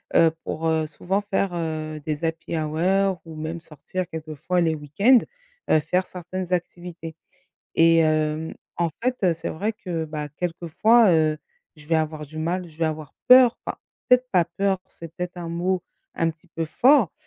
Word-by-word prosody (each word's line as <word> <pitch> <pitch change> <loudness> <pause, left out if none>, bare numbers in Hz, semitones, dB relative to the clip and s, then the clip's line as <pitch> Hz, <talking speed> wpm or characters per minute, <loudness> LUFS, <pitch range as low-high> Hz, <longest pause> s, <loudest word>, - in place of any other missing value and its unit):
heu, 165 -1 +6
pour 165 +1 -2
heu, 160 -1 +1
souvent 190 +5 -2
faire, 195 -2 -1
heu, 155 -2 -3
des 155 +1 -3
happy 165 +1 -2
hours 180 +5 +1
ou 160 -1 -9
même 160 +2 -4
sortir 165 +4 -6
quelquefois 160 +3 -2
les 160 -1 +2
week-ends, 160 - +4 0.5
heu, 155 - +5
faire 180 +4 0
certaines 180 0 -5
activités 175 -2 -4 0.6
et 165 0 +5
hem, 155 0 +1 0.2
en 170 -1 0
fait, 255 0 +1
heu, 175 - +4
c'est 165 - -5
vrai 205 +7 -2
que, 180 -7 -4
bah, 150 -1 -5
quelquefois, 180 +6 +3
heu, 155 -1 +2 0.4
je 150 -1 -16
vais 165 - +1
avoir 155 -1 -2
du 155 +3 -13
mal 175 +3 -2
ou - - -13
je 155 - -19
vais 165 - 0
avoir 155 -2 -4
peur, 250 -1 +8
enfin, - - -5 0.3
peut-être 250 0 +5
pas 180 -3 +4
peur, 190 +2 -1
c'est 165 -1 -11
peut-être 180 0 -5
un 170 -1 -5
mot 180 +2 -1 0.4
un 165 0 +3
petit 160 +2 -18
peu 165 -1 -3
fort, 245 - +4
165 Hz, 180 wpm, -24 LUFS, 155-185 Hz, 0.6 s, peur